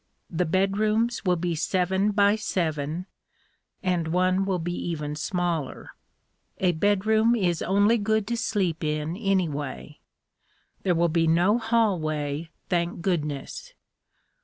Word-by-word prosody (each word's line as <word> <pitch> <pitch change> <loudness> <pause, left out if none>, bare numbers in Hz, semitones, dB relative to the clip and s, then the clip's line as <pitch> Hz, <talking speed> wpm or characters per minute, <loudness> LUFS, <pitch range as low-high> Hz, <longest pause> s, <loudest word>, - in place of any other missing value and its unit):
The 175 0 0
bedrooms 215 +6 +1
will 180 -1 +3
be 175 0 -1
seven 190 +4 +1
by 205 0 +4
seven, 165 -5 -2 0.8
and 180 -3 0
one 185 +3 +2
will 190 -2 0
be 175 +1 -3
even 150 -4 -3
smaller. 170 -3 -2 0.7
A 185 -2 +2
bedroom 210 +6 +2
is 175 -7 0
only 205 +5 +3
good 220 0 +1
to 235 - 0
sleep 190 -8 -1
in, 155 +2 -1
anyway. 155 - -2 0.8
There 180 -2 +1
will 170 +1 +3
be 165 0 +2
no 180 +8 +3
hallway, 165 -10 0 0.2
thank 170 -1 -1
goodness. 175 - -3
180 Hz, 120 wpm, -26 LUFS, 160-205 Hz, 0.8 s, by